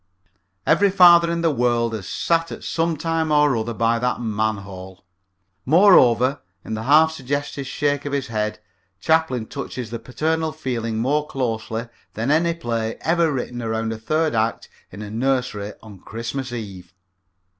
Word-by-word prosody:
Every 200 0 +4
father 175 -3 +7
in 170 0 -1
the 165 -1 +2
world 120 -2 +1
has 105 -4 -5
sat 165 0 0
at - - -8
some 165 -1 -1
time 165 0 -1
or 150 -2 +4
other 115 0 -3
by 115 +1 +1
that 125 +1 -1
manhole. 100 -4 -4 0.6
Moreover, 135 - +5 0.2
in - - -5
the 110 - -3
half 155 +4 +5
suggested 140 -1 -4
shake 145 +1 -1
of 145 - -3
his 140 -2 -1
head 105 -2 -2 0.4
Chaplin 145 - +1
touches 125 -3 -6
the 115 - -4
paternal 160 +4 -2
feeling 120 -7 -3
more 145 +6 0
closely 115 -3 -3 0.3
than 115 +6 -1
any 165 +2 +2
play 115 -7 -3
ever 165 -1 +2
written 125 -2 -4
around 110 0 -2
a 110 - -8
third 155 +6 0
act 110 0 -1 0.2
in 100 +3 -8
a 105 - -8
nursery 120 -4 -1
on 105 -4 -12
Christmas 115 +6 -5
Eve. 95 -6 -8
125 Hz, 155 wpm, -22 LUFS, 110-155 Hz, 0.6 s, father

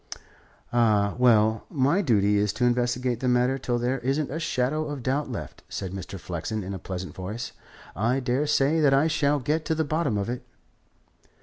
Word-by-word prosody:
"Ah, 105 -4 +3
well; 110 -3 +4
my 145 +6 +2
duty 105 - +3
is 105 -1 +1
to 125 - 0
investigate 120 0 +1
the 130 - -1
matter 125 +2 +2
till 120 -1 -1
there 125 +2 -1
isn't 135 +4 -1
a 160 - -3
shadow 155 +1 0
of 145 -4 -5
doubt 135 +2 -1
left," 115 - -7
said 95 - -4
Mr. 95 0 -7
Flexen 90 +5 -4
in 95 +2 -5
a 95 - -5
pleasant 95 +1 -6
voice. 105 +6 -5 0.4
"I 120 +6 +1
daresay 140 +4 +1
that 140 -3 +4
I 140 +3 +4
shall 150 -2 +2
get 150 +4 -1
to 160 - 0
the 160 0 0
bottom 145 -7 0
of 100 - -2
it." 120 +1 -4
125 Hz, 185 wpm, -26 LUFS, 110-145 Hz, 0.4 s, well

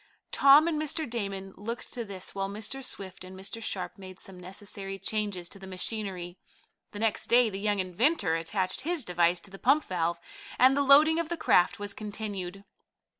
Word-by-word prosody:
Tom 280 +3 +7
and 310 -2 0
Mr. 310 +1 -2
Damon 195 -5 -4
looked 230 +5 -6
to 240 - -3
this, 195 -4 -7
while 195 0 -2
Mr. 215 +6 -4
Swift 190 -7 -4
and 185 +1 -10
Mr. 200 +4 -5
Sharp 185 -3 -4
made 185 -1 -10
some 190 -2 -7
necessary 195 +1 -6
changes 200 -3 -2
to 200 - -8
the 190 - -10
machinery. 185 -2 -4 0.5
The - - -8
next 225 +1 0
day 240 -2 +5
the 195 - -5
young 205 0 +1
inventor 185 - +1
attached 185 +5 0
his 320 -2 0
device 175 0 +2
to 195 - -9
the 195 - -10
pump 280 +4 +4
valve, 170 -1 -1 0.4
and 260 +2 +6
the 285 - +2
loading 300 +4 +6
of 335 -2 -2
the 340 - -2
craft 180 - +3
was 205 -1 -5
continued. 200 -3 -5
200 Hz, 185 wpm, -29 LUFS, 185-240 Hz, 0.5 s, Tom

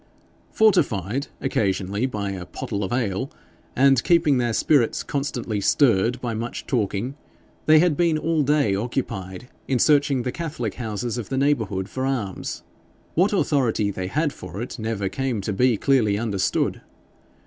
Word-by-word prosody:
Fortified 135 - +2
occasionally 100 -2 0
by 105 -5 -3
a 90 -2 -6
pottle 100 +3 -4
of 95 - -3
ale, 120 0 -1 0.5
and 135 -1 +4
keeping 155 -6 +3
their 120 -1 +1
spirits 120 +1 +2
constantly 125 -7 -3
stirred 120 0 +3
by 120 -2 -3
much 115 +2 -5
talking, 115 +1 -1 0.5
they 155 0 +7
had 165 -1 +4
been 165 0 +2
all 160 0 +1
day 145 -7 +2
occupied 95 -2 -4 0.2
in 130 - +1
searching 140 -1 +3
the 125 - -2
Catholic 145 - -4
houses 120 0 -3
of 110 - -6
the 135 - -2
neighbourhood 110 -9 0
for 130 +3 -4
arms. 110 -9 -3 0.5
What 185 +5 +3
authority 125 - +1
they 95 -1 -4
had 150 - 0
for 90 +1 -8
it 120 +1 -6
never 110 -3 -2
came 120 +4 -2
to 100 +2 -3
be 120 +3 +3
clearly 110 -5 +2
understood. 105 -4 -1
120 Hz, 150 wpm, -23 LUFS, 100-140 Hz, 0.5 s, they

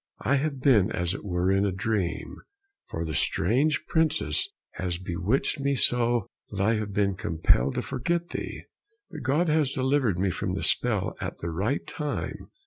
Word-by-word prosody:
I 140 +6 +3
have 140 -1 -2
been 110 -7 +4
as 90 0 -1
it - - -6
were 90 -1 0
in 95 +1 +3
a 100 - +1
dream, 95 -2 -2 0.5
for 85 +1 -3
the 80 - -4
strange 130 - +2
princess 160 - +1 0.2
has 90 -2 -3
bewitched 95 - 0
me 140 0 +1
so 120 -4 +2 0.2
that 100 - -6
I 105 +4 +3
have 105 -1 -3
been 100 0 +1
compelled 80 -7 +2
to - - -1
forget 170 +7 -1
thee, - - -5 0.5
but 155 -4 -7
God 145 +7 +2
has 150 -3 +2
delivered 130 -7 +1
me 95 +1 +1
from - - -2
the - - -3
spell - - +1
at - - -4
the 85 - -4
right 105 - -1
time." 150 -2 -4
110 Hz, 175 wpm, -27 LUFS, 95-140 Hz, 0.5 s, been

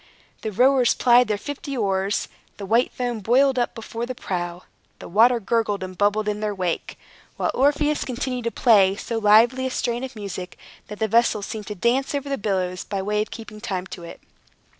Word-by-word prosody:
The 220 - -3
rowers 255 +3 +4
plied 245 -1 +5
their 210 -1 0
fifty 280 +3 -6
oars; 195 -2 0 0.3
the 200 - -6
white 230 +5 +2
foam 245 -2 -3
boiled 255 +5 +3
up 240 - -1
before 230 +1 -5
the 255 - -5
prow; 175 -4 -4 0.3
the - - -10
water 235 +6 +4
gurgled 210 -2 0
and 185 0 -7
bubbled 205 +2 +1
in 210 0 -1
their 210 -1 -2
wake; 180 -3 -3 0.4
while - - 0
Orpheus 290 +2 +2
continued 250 -1 -4
to 230 - 0
play 200 -6 +4
so 225 +2 -4
lively 230 +5 +4
a - - -2
strain 240 -1 -2
of 265 -1 -6
music, 190 -3 -7 0.3
that 210 - -8
the 220 - 0
vessel 225 -1 +2
seemed 210 0 -6
to 210 - -5
dance 260 - 0
over 280 0 -3
the 275 - -2
billows 185 -3 -1
by 195 -2 -4
way 210 +1 0
of 215 - -4
keeping 215 -2 -10
time 185 -3 -3
to 175 - -8
it. 170 - -10
220 Hz, 200 wpm, -23 LUFS, 200-245 Hz, 0.4 s, plied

